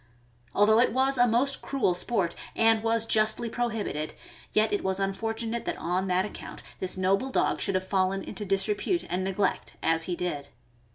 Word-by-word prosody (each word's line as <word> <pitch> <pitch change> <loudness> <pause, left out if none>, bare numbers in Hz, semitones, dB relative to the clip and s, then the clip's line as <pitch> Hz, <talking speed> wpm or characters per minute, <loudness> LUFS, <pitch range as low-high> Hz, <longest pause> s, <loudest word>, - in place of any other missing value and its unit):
Although 215 +2 +5
it 240 - +3
was 265 +1 +2
a 245 - +6
most 245 +5 +1
cruel 270 -10 +1
sport, 180 -1 0 0.2
and 225 -1 +4
was 225 0 +1
justly 220 +1 +1
prohibited, 220 -11 -2 0.4
yet 215 0 +2
it 205 - 0
was 190 0 0
unfortunate 225 +4 -2
that - - -2
on 180 +3 -1
that 185 +1 +2
account 210 - -8 0.2
this 185 0 0
noble 195 +7 +1
dog - - +1
should 195 - 0
have 185 0 -1
fallen 190 0 +1
into 210 0 -5
disrepute 205 - 0
and 180 +1 0
neglect, 195 0 -1
as 165 0 +2
he 180 - -2
did. 170 -6 -3
205 Hz, 175 wpm, -28 LUFS, 185-230 Hz, 0.4 s, a